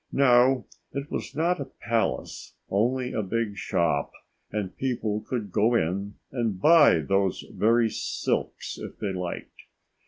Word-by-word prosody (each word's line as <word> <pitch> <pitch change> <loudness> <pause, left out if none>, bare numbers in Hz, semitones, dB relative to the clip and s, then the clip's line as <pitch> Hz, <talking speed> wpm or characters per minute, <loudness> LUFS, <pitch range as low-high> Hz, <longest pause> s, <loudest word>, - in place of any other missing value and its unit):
No, 125 -1 +4 0.3
it 140 +1 -5
was - - -4
not 170 +3 +1
a 140 - -3
palace, 115 -3 -3 0.2
only 125 +5 +1
a 110 - 0
big 105 +1 -2
shop 80 -7 0 0.4
and 100 -3 -3
people 115 -5 -1
could 110 -6 -4
go 115 +6 +3
in 100 +1 -1 0.2
and 115 -7 -1
buy 150 - +6
those 95 +2 +1
very 115 +2 +3
silks - - -2
if - - -8
they 100 -3 -3
liked. 90 -1 -6
115 Hz, 135 wpm, -26 LUFS, 100-130 Hz, 0.4 s, buy